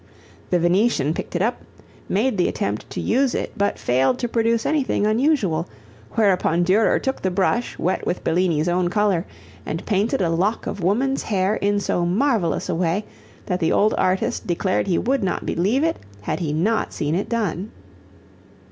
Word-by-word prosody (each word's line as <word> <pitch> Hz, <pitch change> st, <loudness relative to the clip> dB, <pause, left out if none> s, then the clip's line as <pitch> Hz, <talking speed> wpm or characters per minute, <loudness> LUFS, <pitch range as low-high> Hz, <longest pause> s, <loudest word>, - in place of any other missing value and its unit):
The 180 Hz, -, +3 dB
Venetian 175 Hz, -, +2 dB
picked 175 Hz, -, -6 dB
it 175 Hz, -, +1 dB
up, 235 Hz, +3 st, -1 dB, 0.5 s
made 220 Hz, +5 st, +1 dB
the 175 Hz, -, +3 dB
attempt 105 Hz, +2 st, -3 dB
to -, -, -5 dB
use 260 Hz, +1 st, +1 dB
it -, -, -2 dB
but 200 Hz, 0 st, 0 dB
failed 130 Hz, -, +1 dB
to 245 Hz, -, -2 dB
produce 230 Hz, 0 st, +1 dB
anything 275 Hz, -8 st, +1 dB
unusual, 215 Hz, -, +1 dB, 0.4 s
whereupon 185 Hz, -5 st, +2 dB
Durer 195 Hz, +5 st, +3 dB
took 265 Hz, 0 st, -3 dB
the 190 Hz, -, 0 dB
brush 200 Hz, +6 st, 0 dB
wet 185 Hz, -, -1 dB
with 180 Hz, -, -2 dB
Bellini's 165 Hz, -2 st, +1 dB
own 175 Hz, 0 st, +1 dB
color 200 Hz, -3 st, +1 dB, 0.4 s
and 160 Hz, -, -5 dB
painted 210 Hz, +2 st, +1 dB
a 175 Hz, -4 st, +1 dB
lock 195 Hz, +7 st, 0 dB
of 200 Hz, -, -4 dB
woman's 250 Hz, +10 st, +1 dB
hair 195 Hz, -1 st, 0 dB
in 205 Hz, 0 st, +1 dB
so 180 Hz, -2 st, 0 dB
marvelous 190 Hz, -, +1 dB
a -, -, -1 dB
way 175 Hz, +4 st, 0 dB, 0.4 s
that 180 Hz, -2 st, -1 dB
the 165 Hz, -2 st, +1 dB
old 215 Hz, +1 st, +3 dB
artist 185 Hz, +1 st, 0 dB
declared 185 Hz, +3 st, 0 dB
he 180 Hz, -, +2 dB
would 265 Hz, 0 st, 0 dB
not 185 Hz, -, -2 dB
believe 210 Hz, -, +1 dB
it 325 Hz, 0 st, +1 dB, 0.2 s
had 105 Hz, -, -3 dB
he 160 Hz, -5 st, -2 dB
not 205 Hz, +9 st, 0 dB
seen 150 Hz, +1 st, -2 dB
it 185 Hz, +4 st, -1 dB
done. 210 Hz, -4 st, -2 dB
195 Hz, 175 wpm, -22 LUFS, 175-225 Hz, 0.5 s, The